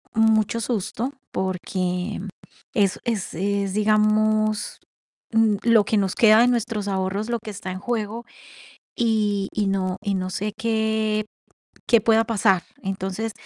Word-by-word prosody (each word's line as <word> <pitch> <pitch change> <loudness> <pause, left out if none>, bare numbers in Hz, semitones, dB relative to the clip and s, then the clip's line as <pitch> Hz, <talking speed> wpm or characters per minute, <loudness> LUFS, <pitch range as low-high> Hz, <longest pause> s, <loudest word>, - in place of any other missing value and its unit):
mucho 220 0 +3
susto, 230 +3 -2 0.2
porque 185 +1 -2 0.5
es 200 -3 +1
es, 225 -5 -2
eh, 200 +3 0
es, 195 - -3
digamos, 215 0 +2 0.5
mm, 220 -2 +3
lo 230 -3 +5
que 220 - +1
nos 195 -2 0
queda 215 -1 +6
de 245 - +5
nuestros 230 -4 -1
ahorros, 195 +3 -2
lo 235 -1 -1
que 215 0 -8
está 190 -2 -6
en 185 - -5
juego, 230 +1 -3 0.7
y 210 -4 +1
y 210 -1 0
no 185 -1 -1
y 200 -2 -1
no 185 -1 -2
sé 205 +3 -3
qué 220 -1 0 0.6
qué 235 -2 +6
pueda 225 +1 +3
pasar. 200 -5 +2 0.2
Entonces, 195 +3 -3
215 Hz, 145 wpm, -23 LUFS, 195-225 Hz, 0.7 s, queda